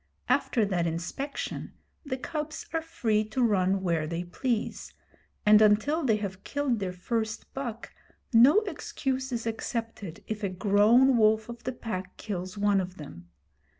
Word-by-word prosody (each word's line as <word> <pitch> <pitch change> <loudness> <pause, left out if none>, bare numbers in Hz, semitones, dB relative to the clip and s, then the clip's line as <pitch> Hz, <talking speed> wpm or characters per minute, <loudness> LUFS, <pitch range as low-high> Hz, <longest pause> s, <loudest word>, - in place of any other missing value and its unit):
After 225 -5 +2
that 180 -4 0
inspection 170 - -4 0.3
the 270 -4 -3
cubs 305 +2 -5
are 325 - +1
free 230 -10 0
to 230 +4 -1
run 195 -3 +2
where 165 -4 0
they 170 +2 -3
please, 225 +6 -3 0.5
and 210 0 +7
until 220 +10 +3
they 230 -5 +3
have 195 -2 -5
killed 280 -5 -1
their 190 -2 -2
first 220 +4 -3
buck 245 -4 -5 0.4
no 265 - +7
excuse 270 -8 -3
is 230 -2 -3
accepted 225 -5 -4
if 215 -1 -4
a 200 - +1
grown 215 +7 +4
wolf 220 0 +3
of 235 0 -9
the 255 - -1
Pack 190 -7 -6
kills 185 -1 -5
one 200 -1 +3
of 185 0 -7
them. 85 - -11
220 Hz, 150 wpm, -28 LUFS, 190-255 Hz, 0.5 s, and